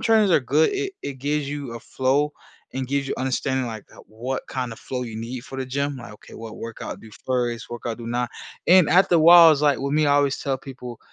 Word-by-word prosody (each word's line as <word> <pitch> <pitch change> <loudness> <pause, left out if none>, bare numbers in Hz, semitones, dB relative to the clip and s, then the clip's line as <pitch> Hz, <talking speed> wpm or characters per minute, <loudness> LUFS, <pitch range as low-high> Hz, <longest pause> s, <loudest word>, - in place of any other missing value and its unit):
trainers 220 -3 +3
are 165 - +5
good. 145 +5 +2
It 395 0 -2
it 140 - -4
gives 145 +2 -1
you 140 -5 -5
a 115 - -7
flow, 135 +5 0 0.4
and 130 -1 -3
gives 140 0 -1
you - - -2
understanding, 130 0 -1
like, 110 -3 -7
that - - -16
what 120 +5 -4
kind 125 -3 -3
of 115 - -11
flow 130 -1 -5
you 115 -3 -7
need 120 +3 -5
for 135 - -8
the 130 - -3
gym. 140 +2 -2
Like, 115 - -10
okay, - - -17
"What 115 -1 -9
workout 115 -1 -7
do 110 - -14 0.2
first, 120 -3 -1
workout 120 -1 -5
do 115 - -8
now." 120 +1 -1 0.4
And 180 -2 +6
after 180 -1 +4
a - - +4
while, 165 0 +9
it's, 145 - -1
like, 145 -2 +3
with 140 +1 -3
me, 155 0 +3
I 145 - +4
always 140 -1 +2
tell 135 -1 -2
people 125 -3 -9
130 Hz, 245 wpm, -23 LUFS, 120-145 Hz, 0.4 s, while